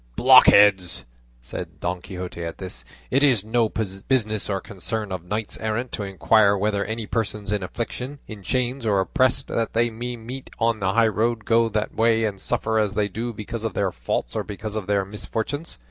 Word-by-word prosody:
"Blockhead!" 100 -2 +8 0.6
said - - -7
Don 90 +1 -2
Quixote 90 -2 -6
at 85 0 -5
this, 90 -10 -7 0.3
"it 135 +3 +3
is 120 -8 +4
no 115 0 +2
business 110 +1 -1
or 100 -1 0
concern 100 +3 -5
of 90 -2 -4
knights 105 +4 -4
errant 115 +3 -2
to - - -3
inquire 100 +1 +3
whether 100 0 0
any 110 +2 -4
persons 105 -2 -2
in 105 -1 0
affliction, 120 +8 -5
in 110 -2 -9
chains, 125 +5 -1
or 105 -3 +2
oppressed 130 +6 +1
that 115 -1 -1
they 115 +1 +2
may 120 +2 -4
meet 125 +4 -8
on 115 -1 +1
the 95 -1 0
high 115 +1 +5
roads 110 +2 0
go 115 0 +3
that 105 0 -2
way 115 0 +3
and 100 -3 -2
suffer 110 0 0
as 105 -2 0
they 105 -1 +1
do 115 +5 -3
because 110 +1 -6
of 115 - -3
their 100 -2 +1
faults 60 -3 -3
or - - 0
because 105 +1 -6
of 105 -3 -3
their 100 -1 +1
misfortunes. 110 - -4
110 Hz, 190 wpm, -24 LUFS, 100-115 Hz, 0.6 s, Blockhead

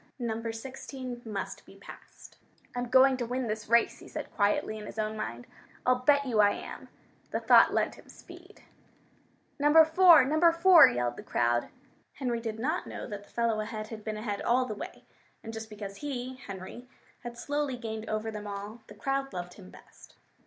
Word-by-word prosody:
Number 230 -2 -3
16 255 +1 -7
must 200 -4 -5
be - - -17
passed. - - -14 0.4
"I'm 245 -1 -3
going 260 +1 +5
to 245 - -2
win 250 +1 -2
this 215 -1 -4
race!" 235 0 +3
he - - -13
said - - -7
quietly 210 +1 +1
in 210 - -8
his - - -10
own 215 0 -2
mind. 120 - -5 0.4
"I'll 250 0 +3
bet 280 +2 +3
you 235 -5 0
I 205 -1 +5
am!" - - -9 0.4
The - - -2
thought - - +6
lent - - 0
him - - -18
speed. - - -15 1.0
"Number 300 +3 +7
4! 325 -3 +7
Number 315 +5 +4
4!" 340 +1 +8
yelled 120 0 -1
the - - -7
crowd. 120 0 0 0.4
Henry 245 -4 -2
did 225 -2 -5
not 305 +10 -2
know - - -6
that 205 -1 -7
the - - -24
fellow 230 -2 0
ahead 215 0 -5
had 220 -2 -8
been 215 0 -4
ahead 210 -2 -4
all 255 +2 +2
the 225 - -4
way, 210 - -9 0.4
and 225 - -7
just 220 0 -7
because 205 -2 -8
he 260 -3 -5
Henry 195 +5 -8 0.3
had 240 0 -8
slowly 290 0 -2
gained 220 -2 -6
over 215 +1 -2
them 210 -1 -7
all, 205 +3 -7
the 210 - -13
crowd 270 +5 -2
loved 180 -1 -6
him 190 -2 -13
best. - - -17
230 Hz, 190 wpm, -29 LUFS, 210-260 Hz, 1.0 s, 4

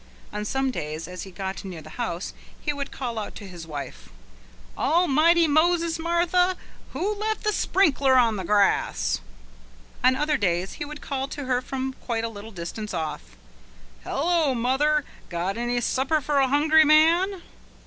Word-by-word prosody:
On 210 0 -3
some 265 +3 0
days 155 -5 -5
as 180 0 -7
he - - -10
got 190 +2 -5
near 180 -5 -7
the 155 - -12
house 180 -6 -3 0.3
he 295 - -2
would 280 -1 -5
call 240 -4 -4
out 210 - -6
to 205 - -8
his 175 -3 -9
wife: 140 - -7 0.7
"Almighty 335 +1 +4
Moses, 330 +2 +2
Martha! 350 +2 +2 0.4
who 370 +10 -1
left 435 +1 -2
the 425 -1 +1
sprinkler 280 -11 +3
on 230 -3 +4
the 190 - -4
grass?" 200 - +2 0.8
On 255 +1 +5
other 300 +2 +1
days 180 -3 0
he - - -5
would 295 0 -9
call 270 -1 -3
to 285 0 -6
her 250 -1 +1
from 265 0 -4
quite 230 -2 -2
a 230 - -1
little 215 0 -9
distance 195 +2 -6
off: 150 - -5 0.7
"Hullo, 315 -2 +1
mother! 275 +5 +2 0.2
Got 175 +3 -2
any 240 +1 -1
supper 270 +6 +1
for 290 0 0
a 270 - +4
hungry 305 +3 +5
man?" 335 +5 +4
265 Hz, 165 wpm, -25 LUFS, 200-315 Hz, 0.8 s, On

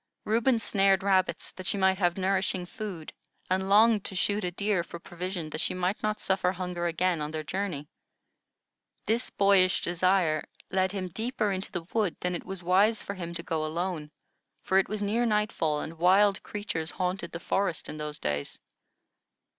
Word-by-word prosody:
Reuben 235 +3 +3
snared 195 -3 +3
rabbits, 190 -2 +1
that 185 0 -7
she 200 - +2
might 190 0 +3
have 175 -2 +2
nourishing 190 -1 0
food, 180 -4 -7 0.4
and 190 +1 +1
longed 215 0 +5
to 190 - -5
shoot 205 +2 +1
a 180 - 0
deer 200 0 0
for 170 - -8
provision, 175 -2 -5
that 155 - -3
she - - 0
might 185 +3 -1
not 215 0 -1
suffer 190 -1 +1
hunger 180 -2 -3
again 170 0 +1
on 150 - -2
their 155 0 -4
journey. 175 -4 -3 1.2
This 230 +3 0
boyish 195 -2 +4
desire 175 -3 +2 0.3
led 190 -1 +2
him 190 -2 -3
deeper 220 +1 -1
into 190 0 -4
the 170 -2 -4
wood 210 -6 +1
than 180 0 -1
it 175 - -4
was 190 -1 -7
wise 200 +5 +3
for 200 - -4
him 170 -3 -6
to 170 - -5
go 160 -2 -1
alone, 160 -1 -3 0.5
for 190 - +3
it 195 - 0
was 210 0 -2
near 220 +4 +1
nightfall, 210 -9 +1
and 160 0 -7
wild 195 +3 +4
creatures 190 -6 -3
haunted 180 -1 -2
the 170 - -5
forest 190 -2 -1
in 155 - -6
those 150 0 -4
days. 70 -1 -3
185 Hz, 180 wpm, -28 LUFS, 170-200 Hz, 1.2 s, longed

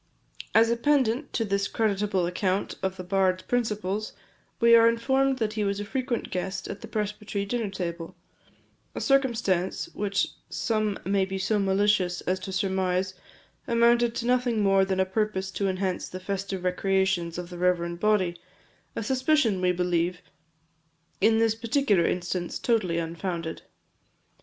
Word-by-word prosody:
As 225 +1 +6
a - - +3
pendant 265 0 +1
to 225 - 0
this 200 -1 0
creditable 200 -4 0
account 185 +2 -1
of 190 0 -2
the 185 - -6
bard's 185 0 +1
principles, 215 -4 -2 0.5
we 235 0 +7
are 230 0 +7
informed 265 +3 +1
that 220 -3 -1
he 215 -1 -1
was 200 0 -1
a 205 - -4
frequent 255 +1 -3
guest 190 +1 -3
at 195 - -7
the 225 - -8
presbytery 210 -2 -3
dinner 225 0 -2
table; 170 -3 -5 0.8
a - - -3
circumstance 230 - +1
which 200 -1 0 0.2
some 215 -3 -1
may 195 0 +2
be 190 0 -3
so 205 +2 0
malicious 195 -2 +2
as 185 +1 -1
to 190 - -6
surmise 190 -1 0 0.5
amounted 235 0 +3
to 235 - -3
nothing 245 -3 +2
more 195 -1 +4
than 190 -1 -1
a 190 - +3
purpose 190 -1 -1
to 200 +1 -1
enhance 185 -1 -2
the 185 - -7
festive 195 0 -4
recreations 185 -2 0
of 180 0 -6
the 175 - -7
reverend 170 -1 0
body 190 -4 +2 0.6
a - - -2
suspicion, 255 -4 +2
we 180 0 +3
believe, 180 0 0 1.0
in 220 +2 +5
this 225 -1 +3
particular 225 -5 +1
instance, 175 0 -2
totally 205 -8 +1
unfounded. 170 0 -4
195 Hz, 150 wpm, -26 LUFS, 185-225 Hz, 1.0 s, we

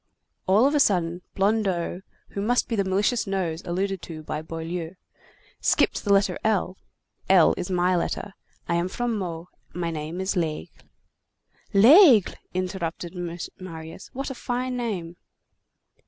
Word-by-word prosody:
All 205 +6 +5
of 285 - +3
a 295 - +3
sudden, 175 -7 +2
Blondeau, 195 -3 0 0.3
who 200 - -4
must 245 +4 +1
be 230 - -1
the 200 - +1
malicious 200 +5 +1
nose 180 -4 -2
alluded 190 +2 -2
to 160 -3 -8
by 150 0 -4
Boileau, 165 +2 -5 0.6
skipped - - +2
to - - -6
the 205 - 0
letter 200 0 +3
L. 200 -4 +1 0.5
L 185 -4 +6
is 180 - -5
my 180 0 +2
letter. 190 +3 -2 0.3
I 170 - +1
am 170 +1 0
from 240 +4 -2
Meaux, 175 -4 -4 0.3
and 180 - -5
my 170 -1 -1
name 160 +2 -5
is 190 +1 -1
Lesgle." 160 -4 -4 0.8
"L'Aigle!" 245 - +7 0.2
interrupted 180 -2 -3 0.5
Marius, 165 -1 -9
"what 270 0 -5
fine 250 +1 -3
name!" 190 -9 -4
185 Hz, 145 wpm, -25 LUFS, 170-210 Hz, 0.8 s, L'Aigle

